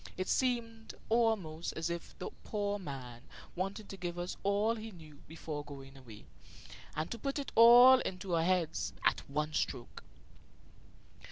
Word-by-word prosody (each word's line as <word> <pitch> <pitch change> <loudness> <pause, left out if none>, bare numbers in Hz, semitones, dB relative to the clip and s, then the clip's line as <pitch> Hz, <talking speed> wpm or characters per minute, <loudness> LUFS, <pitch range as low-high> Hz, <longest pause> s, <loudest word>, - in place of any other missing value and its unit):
It 185 - -2
seemed 230 -3 -1
almost 220 -9 +1
as 165 +1 -2
if 170 0 -6
the - - -6
poor 205 -1 -2
man 130 -8 -7 0.3
wanted 195 +3 -4
to 195 - -7
give 175 -1 -4
us 175 +1 -4
all 205 +3 +2
he 225 -1 -7
knew 155 -7 -14
before 155 -2 -6
going 135 -2 -11
away, 120 -6 -13 0.7
and 155 +2 -3
to 235 - -4
put 275 +5 -2
it 285 - -4
all 245 +3 +9
into 185 -4 -4
our 165 -1 +3
heads 180 -2 0
at - - +3
one 150 +2 -2
stroke. - - -3
185 Hz, 155 wpm, -33 LUFS, 155-225 Hz, 0.7 s, all